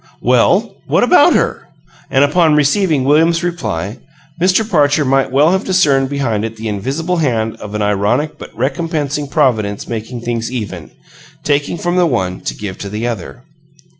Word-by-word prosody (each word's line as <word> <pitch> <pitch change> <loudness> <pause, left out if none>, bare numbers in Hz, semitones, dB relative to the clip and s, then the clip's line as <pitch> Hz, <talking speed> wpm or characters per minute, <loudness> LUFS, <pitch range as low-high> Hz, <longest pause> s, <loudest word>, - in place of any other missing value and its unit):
"Well, - - +2
what - - +2
about - - +5
her?" - - -1 0.4
And 135 - +3
upon 155 +1 +3
receiving 150 0 +2
William's 165 +5 +3
reply, 115 - -3 0.4
Mr. 190 +4 +2
Parcher 145 -5 +2
might 135 0 +1
well 145 +5 +4
have 190 +2 0
discerned 145 -8 +2
behind 125 -7 -1
it 115 0 -4
the 110 0 -6
invisible 135 - -2
hand 115 -8 0
of 105 0 -8
an 105 - -1
ironic 105 +9 0
but - - -9
recompensing 150 +1 -2
Providence 110 -9 0
making 115 +1 -5
things 115 0 -3
even 100 -9 -5 0.5
taking 145 +3 0
from 175 +1 -1
the 180 -1 +4
one 90 - -2
to - - -3
give 100 -3 -7
to 100 - -6
the 105 +3 -4
other. 120 +1 -5
135 Hz, 165 wpm, -16 LUFS, 110-160 Hz, 0.5 s, about